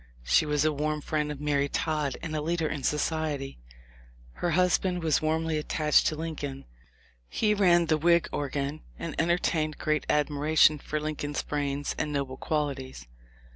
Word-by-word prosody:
She 150 - +3
was 150 0 +1
a 155 - +2
warm 150 +1 -1
friend 150 0 -1
of 145 - -7
Mary 145 -1 0
Todd 150 -3 -1
and 160 -2 -4
a 155 - -1
leader 165 +1 0
in 150 -2 -4
society. 150 - -1 0.7
Her 175 - -2
husband 180 -1 +2
was 155 -2 +2
warmly 160 0 0
attached 150 0 +2
to 155 - 0
Lincoln. 150 -4 -5 0.6
He 210 -1 +1
ran 175 -4 +4
the 155 -1 +1
Whig 170 +1 +4
organ, 140 +1 -3 0.2
and 165 -2 -5
entertained 160 -2 0
great 155 0 -1
admira 150 +1 0
tion 155 -1 +7
for 150 +2 -3
Lincoln's 150 -1 -3
brains 145 -1 -2
and 150 - -1
noble 135 -2 -3
qualities. 135 - -3
150 Hz, 160 wpm, -28 LUFS, 145-160 Hz, 0.7 s, tion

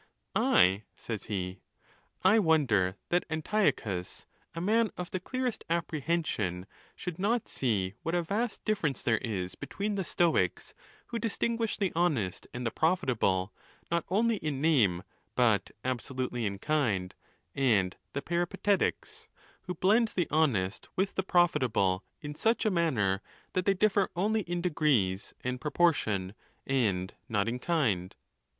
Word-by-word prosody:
I? 95 +3 +4
says 110 -3 -5
he. 95 -2 -4 0.6
I 200 +4 +6
wonder 130 - +3
that 175 +1 +2
Anti 175 +7 +2
ochus, 90 -4 -6 0.3
a - - -3
man 220 +5 +2
of 180 0 -5
the 185 - -2
clearest 255 +5 -3
apprehension, 155 - -1 0.3
should 180 -1 -6
not 225 +4 +1
see 100 -7 0
what 165 +2 -1
a 175 - +1
vast 210 +6 -2
difference 185 - 0
there 110 -3 +2
is 95 -6 -3
between 205 +2 -3
the 195 -1 -1
Stoics, 165 - +1 0.4
who 235 - -2
distinguish 230 0 -1
the 195 -4 0
honest 145 - 0
and 125 0 -5
the 115 - 0
profitable, 115 - +1 0.4
not 170 -1 +1
only 220 +4 +2
in 150 -6 -3
name, 115 - +3 0.3
but 115 -5 +3 0.2
absolutely 125 -2 -2
in 100 0 -4
kind, 105 -9 0 0.4
and 105 -9 +2 0.2
the 140 - -3
Peripatetics, 175 +4 -1 0.4
who 180 - -3
blend 215 +3 +3
the 175 - +1
honest 115 -12 +1
with 195 +1 0
the - - 0
profitable 125 - +2 0.2
in 150 -2 -5
such 225 +9 +1
a 215 - +3
manner 115 - +1 0.3
that 185 0 0
they 195 - +4
dif 210 +3 +3
fer 195 -1 +2
only 215 +5 +1
in 175 -2 -3
degrees 135 - +1
and 125 0 -3
proportion, 135 - +1 0.3
and 100 -9 0 0.2
not 105 -1 +1
in 120 +2 -2
kind. 115 - 0
150 Hz, 145 wpm, -30 LUFS, -, 0.6 s, I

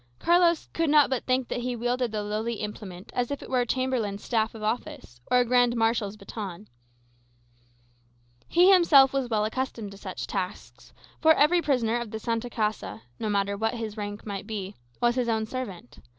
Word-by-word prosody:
Carlos 345 - +3
could 330 -2 +1
not 295 -2 +5
but 260 - -1
think 255 -1 +1
that - - -3
he 245 0 -2
wielded 245 0 -1
the 210 -1 -2
lowly 215 +3 -2
implement 205 -3 -7
as 245 -1 -1
if 285 -1 -4
it - - -11
were 255 - +2
a 240 - -2
chamberlain's 240 -6 -1
staff 225 -1 0
of 215 - -8
office, 215 - -4
or 250 - +4
a 250 - +4
grand 245 0 +3
marshal's 225 -3 0
baton. 200 -1 -7 1.8
He 355 +3 +5
himself 285 -7 +6
was 270 -3 -1
well 215 -2 +1
accustomed 225 -3 -3
to 200 - -11
such - - -6
tasks; - - -6 0.3
for 320 0 +6
every 335 +5 +4
prisoner 240 -6 +1
of 235 -2 -5
the 220 - -5
Santa 230 +2 -2
Casa, 210 - -3 0.2
no 215 - -2
matter 200 0 0
what 225 +3 -1
his 220 -3 -5
rank 205 -1 -6
might 200 -1 -5
be, 205 -3 -5 0.3
was 240 0 +3
his 245 -1 -1
own 220 -1 0
servant. 220 - -7
230 Hz, 190 wpm, -27 LUFS, 210-255 Hz, 1.8 s, himself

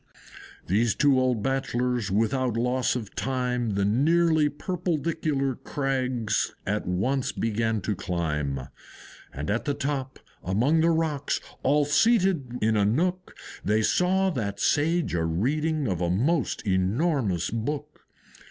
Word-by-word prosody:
Those 110 +4 +1
two 140 -3 +4
old 125 -4 +1
Bachelors 125 -4 -1
without 115 +4 0
loss 125 +2 +1
of 110 -5 -5
time 125 -4 -1
The 100 0 +1
nearly 155 +7 +3
purpledicular 155 -5 -2
crags 130 -6 -1
at 105 +2 -2
once 125 +9 0
began 115 -1 -1
to 105 +1 -2
climb; 75 -7 -2 0.7
And 70 +6 -4
at 110 - -1
the 145 - 0
top, 135 -2 -3 0.3
among 125 - +2
the 165 - +4
rocks, 160 -3 0 0.2
all 145 +2 +3
seated 165 - +2
in 110 0 +3
a 105 - +3
nook, 175 - 0 0.3
They 105 +1 +2
saw 190 - +2
that 100 - -3
Sage 160 - +1
a 85 -1 0
reading 145 - 0
of 90 -4 -2
a 85 - +1
most 130 - 0
enormous 100 - 0
book. 120 +7 -4
130 Hz, 130 wpm, -26 LUFS, 105-150 Hz, 0.7 s, two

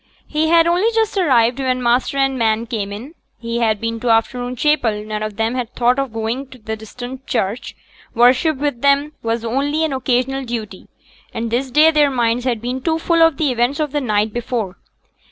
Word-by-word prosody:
He 310 +1 0
had 330 0 +5
only 360 +7 +2
just 445 -1 +1
arrived 255 - +3
when 255 -1 -1
master 245 +3 +1
and 270 -1 +2
man 225 -2 +1
came 210 -4 -4
in. 235 +10 -8 0.2
He 230 0 -3
had 220 -3 +1
been 230 +1 -3
to 240 - -2
afternoon 245 +2 +1
chapel; 235 -7 +1
none 215 0 -4
of 215 -1 -4
them 225 +2 -1
had 250 -2 -4
thought 245 +2 +2
of 275 -3 -2
going 225 +5 -3
to 260 - -14
the 220 -1 -5
distant 245 +4 -9
church; 220 -1 -2 0.4
worship 255 +6 +4
with 285 -4 -2
them 280 +2 +2
was 230 0 -2
only 285 +7 0
an 305 - -2
occasional 265 +1 0
duty, 225 -6 -6 0.5
and 230 0 -3
this 255 +3 -1
day 305 +5 +5
their 300 -2 +3
minds 240 -1 0
had 240 -4 -1
been 250 +2 -3
too 320 +3 0
full 335 0 +1
of 325 -4 +4
the 300 -4 +1
events 245 +5 0
of 300 -2 -1
the 295 0 -1
night 210 -3 0
before. 230 -5 -3
250 Hz, 205 wpm, -19 LUFS, 230-280 Hz, 0.5 s, had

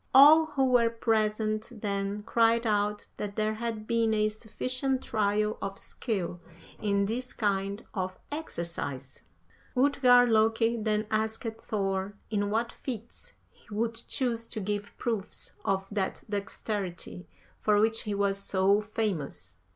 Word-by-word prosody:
All 310 +4 +9
who 275 -3 +1
were 245 -3 +4
present 215 -1 0
then 200 0 -2
cried 230 +1 +3
out 210 -1 +1
that 205 -1 -4
there 215 0 +1
had 220 -1 -4
been 225 -1 +2
a 215 0 +3
sufficient 255 +5 -2
trial 210 0 +1
of 195 0 -4
skill 185 -7 -3 0.4
in 200 -1 +2
this 245 +5 -3
kind 200 0 -1
of 185 -2 -3
exercise. 170 - -5 0.5
50. - - 0
"Utgard 250 -3 +6
Loki 225 +1 +3
then 215 -1 0
asked 220 0 0 0.2
Thor 195 -1 -1 0.2
in 205 -1 +1
what 230 +2 0
feats 235 -3 -6 0.2
he - - -26
would 225 +2 0
choose 230 -1 -1
to - - -5
give 205 0 -3
proofs 225 -5 -3
of 195 0 0
that 200 -2 -2
dexterity 200 -3 -4 0.3
for 210 -1 +3
which 225 +1 +2
he 210 -2 -3
was 200 0 +1
so 195 +1 +3
famous. 210 -8 -3
215 Hz, 135 wpm, -29 LUFS, 200-230 Hz, 0.5 s, All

